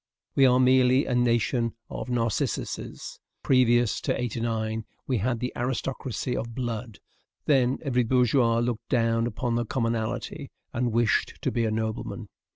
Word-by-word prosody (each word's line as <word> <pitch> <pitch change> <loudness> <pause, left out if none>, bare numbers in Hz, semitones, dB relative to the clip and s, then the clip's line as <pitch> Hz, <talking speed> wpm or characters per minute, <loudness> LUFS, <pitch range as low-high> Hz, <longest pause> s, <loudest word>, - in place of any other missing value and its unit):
We 135 -1 +5
are 125 0 +4
merely 130 +1 +4
a 125 - -2
nation 120 -1 +1
of - - -6
Narcissuses. 115 -3 -2 0.2
Previous 120 -3 +3
to - - -1
'89, 115 -2 -2 0.2
we 130 -4 0
had 120 +3 0
the 125 +1 -3
aristocracy 125 0 -2
of 115 0 -4
blood; 120 -3 -4 0.5
then 135 -3 +3
every 125 -4 +1
bourgeois 120 -1 +3
looked 120 -1 -2
down 115 -1 +2
upon 120 +1 -2
the 120 0 +1
commonalty, 115 +4 -2 0.2
and 120 -1 0
wished 115 -1 +1
to - - +1
be 115 -1 0
a - - +1
nobleman. 110 0 -3
120 Hz, 145 wpm, -26 LUFS, 115-125 Hz, 0.5 s, We